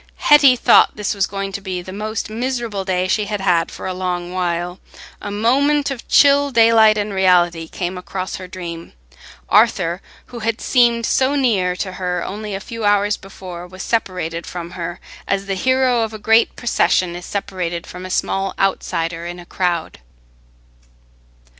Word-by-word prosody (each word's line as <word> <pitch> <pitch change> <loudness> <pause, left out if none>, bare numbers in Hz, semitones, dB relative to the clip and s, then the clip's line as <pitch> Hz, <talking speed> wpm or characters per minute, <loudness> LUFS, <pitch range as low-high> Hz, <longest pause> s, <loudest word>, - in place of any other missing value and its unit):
Hetty 285 -3 +6
thought 240 - +5
this 210 0 -2
was 200 -1 0
going 195 0 -4
to 200 +1 -5
be 190 -2 -4
the 185 - -9
most 215 +2 -4
miserable 235 -3 -3
day 185 -1 0
she 210 +3 +1
had 210 0 -3
had 180 -3 +2
for - - -9
a 185 - -2
long 180 -1 -3
while, 175 0 -2 0.4
a 205 - -5
moment 275 +8 +2
of 255 -4 -7
chill 285 0 +5
daylight 225 -3 +5
and 205 0 -2
reality 175 -3 +2
came 180 +2 -4
across 185 0 -5
her 185 - -8
dream: 170 -2 -8 0.5
Arthur, 190 -5 +3 0.3
who 235 - -6
had 225 +1 -2
seemed 235 -2 +3
so 265 +2 +2
near 205 -10 +1
to 185 +1 -4
her 180 -1 -3
only 210 0 -5
a - - -4
few 230 +2 -7
hours 205 0 +3
before, 180 -2 -10
was 185 +1 -9
separated 180 -7 -2
from 175 -1 -6
her, 175 -1 -6 0.3
as 195 0 -1
the 195 - -2
hero 260 +3 +2
of 220 -1 -3
a - - -5
great 225 +2 +3
procession 185 -6 +1
is 175 - -7
separated 180 -4 -4
from 180 +1 -9
a 185 - -7
small 195 +1 -1
outsider 170 -3 -1
in 175 0 -6
the 175 - -11
crowd. 175 - -2
195 Hz, 170 wpm, -19 LUFS, 180-225 Hz, 0.5 s, Hetty